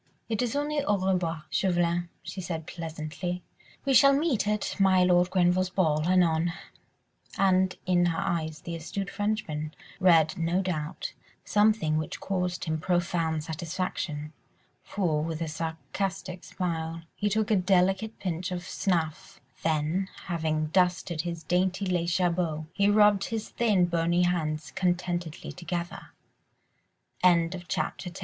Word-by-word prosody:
"It 220 Hz, -1 st, 0 dB
is 245 Hz, +1 st, -1 dB
only 290 Hz, 0 st, 0 dB
au 205 Hz, -6 st, +2 dB
revoir, 180 Hz, -4 st, -1 dB
Chauvelin," 175 Hz, -2 st, +1 dB
she 190 Hz, -, -6 dB
said 165 Hz, -3 st, -4 dB
pleasantly, 165 Hz, +2 st, -5 dB, 0.4 s
"we 275 Hz, -, +2 dB
shall 275 Hz, +3 st, +7 dB
meet 280 Hz, -7 st, +1 dB
at 210 Hz, -1 st, -1 dB
my 190 Hz, -2 st, +5 dB
Lord 180 Hz, 0 st, +4 dB
Grenville's 185 Hz, 0 st, +2 dB
ball, 160 Hz, -4 st, +1 dB
anon." 170 Hz, -2 st, +3 dB, 0.8 s
And 190 Hz, -1 st, +3 dB
in 175 Hz, -1 st, +3 dB
her 165 Hz, -1 st, 0 dB
eyes 160 Hz, -2 st, -2 dB
the 170 Hz, -, -5 dB
astute 180 Hz, +4 st, -4 dB
Frenchman 165 Hz, -8 st, -2 dB, 0.2 s
read, 170 Hz, -1 st, +4 dB
no 170 Hz, +3 st, +1 dB
doubt, 155 Hz, -5 st, -3 dB, 0.3 s
something 210 Hz, -7 st, +3 dB
which 155 Hz, -, -5 dB
caused 180 Hz, -2 st, -2 dB
him 160 Hz, -1 st, -1 dB
profound 170 Hz, -2 st, 0 dB
satisfaction, 160 Hz, -2 st, -4 dB, 0.5 s
for, 165 Hz, -7 st, -1 dB
with 160 Hz, 0 st, -3 dB
a 165 Hz, -, -2 dB
sarcastic 175 Hz, +4 st, -4 dB
smile, 165 Hz, -2 st, -3 dB
he 210 Hz, -, 0 dB
took 215 Hz, +1 st, 0 dB
a -, -, +5 dB
delicate 190 Hz, +3 st, +2 dB
pinch 180 Hz, -1 st, -3 dB
of 175 Hz, -1 st, -4 dB
snuff, 165 Hz, -5 st, -2 dB, 0.2 s
then, 160 Hz, +4 st, 0 dB, 0.2 s
having 155 Hz, -3 st, -1 dB
dusted 180 Hz, -3 st, +2 dB
his 170 Hz, -1 st, -5 dB
dainty 185 Hz, +2 st, +1 dB
lace 175 Hz, -2 st, +1 dB
jabot, 170 Hz, -4 st, 0 dB
he 200 Hz, 0 st, +3 dB
rubbed 205 Hz, -1 st, +5 dB
his 220 Hz, -1 st, -4 dB
thin, 210 Hz, -6 st, +3 dB
bony 170 Hz, +1 st, +2 dB
hands 155 Hz, -4 st, -1 dB
contentedly 175 Hz, -2 st, -2 dB
together. 175 Hz, -1 st, -5 dB
175 Hz, 130 wpm, -28 LUFS, 165-190 Hz, 0.8 s, shall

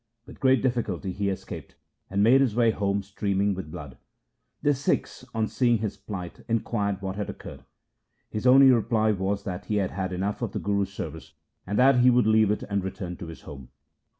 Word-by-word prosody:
With -, -, -13 dB
great 130 Hz, -1 st, +3 dB
difficulty 110 Hz, -8 st, -1 dB
he 100 Hz, +2 st, -1 dB
escaped, 95 Hz, -, -7 dB, 0.3 s
and 100 Hz, +1 st, +1 dB
made 130 Hz, +5 st, +6 dB
his 125 Hz, -6 st, +1 dB
way 115 Hz, -2 st, +4 dB
home 100 Hz, -1 st, -1 dB
streaming 100 Hz, 0 st, 0 dB
with 95 Hz, -4 st, -6 dB
blood. 70 Hz, -4 st, -9 dB, 0.6 s
The 145 Hz, -, +4 dB
Sikhs 140 Hz, -1 st, -1 dB
on 110 Hz, -1 st, +1 dB
seeing 120 Hz, -1 st, +2 dB
his 105 Hz, -1 st, -3 dB
plight 90 Hz, -5 st, -8 dB
inquired 105 Hz, -3 st, -1 dB
what 95 Hz, +1 st, -4 dB
had 105 Hz, -, -3 dB
occurred. -, -, -9 dB, 0.6 s
His 110 Hz, +4 st, -2 dB
only 135 Hz, +1 st, +8 dB
reply 110 Hz, -2 st, +2 dB
was 100 Hz, 0 st, -1 dB
that 95 Hz, +1 st, -5 dB
he 105 Hz, -, -2 dB
had 100 Hz, -3 st, 0 dB
had 95 Hz, -2 st, -3 dB
enough 95 Hz, +3 st, -2 dB
of -, -, -3 dB
the -, -, -2 dB
Guru's 100 Hz, -1 st, -1 dB
service, -, -, -7 dB, 0.3 s
and 100 Hz, +2 st, -1 dB
that 130 Hz, +1 st, +5 dB
he 125 Hz, +1 st, +6 dB
would 125 Hz, -1 st, +4 dB
leave 110 Hz, -1 st, +4 dB
it 105 Hz, -, -1 dB
and 100 Hz, -2 st, -2 dB
return 90 Hz, -1 st, -5 dB
to 85 Hz, -, -8 dB
his 80 Hz, -, -10 dB
home. 70 Hz, -4 st, -10 dB
100 Hz, 200 wpm, -26 LUFS, 95-115 Hz, 0.6 s, only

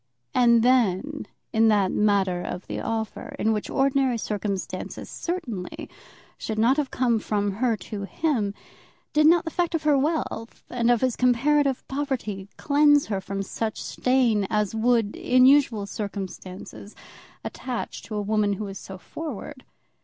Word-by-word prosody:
And 235 Hz, -2 st, +5 dB
then, 255 Hz, +3 st, +2 dB, 0.3 s
in 225 Hz, 0 st, +4 dB
that 205 Hz, -3 st, +3 dB
matter 195 Hz, -4 st, +2 dB
of 180 Hz, +1 st, -5 dB
the -, -, -4 dB
offer, 220 Hz, -1 st, -4 dB
which 215 Hz, -1 st, 0 dB
in -, -, -6 dB
ordinary 270 Hz, -2 st, +2 dB
circumstances 205 Hz, -3 st, -4 dB
certainly 250 Hz, -, -5 dB, 0.5 s
should 220 Hz, -, -4 dB
not 240 Hz, +6 st, +3 dB
have 290 Hz, -3 st, 0 dB
come 240 Hz, -3 st, +1 dB
from 205 Hz, -1 st, -1 dB
her 225 Hz, +2 st, 0 dB
to 200 Hz, +2 st, -6 dB
him, 220 Hz, -6 st, -1 dB, 0.6 s
did 305 Hz, 0 st, +5 dB
not 340 Hz, +1 st, +5 dB
the 325 Hz, -, -3 dB
fact 345 Hz, 0 st, 0 dB
of 320 Hz, -, -2 dB
her 300 Hz, -1 st, +4 dB
wealth 275 Hz, -5 st, -2 dB
and 240 Hz, -1 st, +1 dB
of 240 Hz, -2 st, +3 dB
his 255 Hz, -2 st, +1 dB
comparative 270 Hz, +2 st, +2 dB
poverty 255 Hz, -9 st, -3 dB
cleanse 290 Hz, 0 st, +4 dB
her 195 Hz, -3 st, -2 dB
from 195 Hz, +1 st, -4 dB
such 220 Hz, +3 st, -3 dB
stain 240 Hz, -6 st, +1 dB
as 210 Hz, -1 st, 0 dB
would, 225 Hz, -1 st, +2 dB
in 255 Hz, 0 st, +4 dB
usual 260 Hz, -7 st, +4 dB
circumstances, 200 Hz, -1 st, -7 dB, 0.5 s
attach 250 Hz, -2 st, -5 dB
to 215 Hz, -, -7 dB
a 210 Hz, -, -1 dB
woman 210 Hz, 0 st, +1 dB
who 210 Hz, +2 st, -4 dB
is 195 Hz, -1 st, -7 dB
so 190 Hz, -, -9 dB
forward? 280 Hz, -, -7 dB
230 Hz, 155 wpm, -25 LUFS, 205-270 Hz, 0.6 s, And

